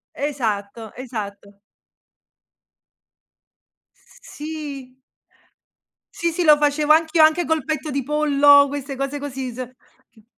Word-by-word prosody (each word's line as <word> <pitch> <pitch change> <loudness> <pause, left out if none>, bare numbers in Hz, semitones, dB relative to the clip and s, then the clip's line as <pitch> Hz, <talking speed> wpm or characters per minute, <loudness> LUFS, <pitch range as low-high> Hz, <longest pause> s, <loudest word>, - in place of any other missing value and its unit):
Esatto, 225 -6 -4
esatto. 205 -5 -8 2.4
S - - -23
sì. 290 -4 -8 1.2
Sì, 340 - 0
sì, 345 +2 -2
lo 305 -2 +7
facevo 295 +1 +2
anch'io 320 0 +4
anche 315 +3 +3
col 320 -3 -1
petto 310 -1 -3
di 275 -2 -3
pollo 285 -1 +5
queste 280 0 -6
cose 275 +2 -4
così 265 -3 -6
se 255 +1 -8 0.4
ch 220 -2 -23
285 Hz, 110 wpm, -21 LUFS, 255-305 Hz, 2.4 s, lo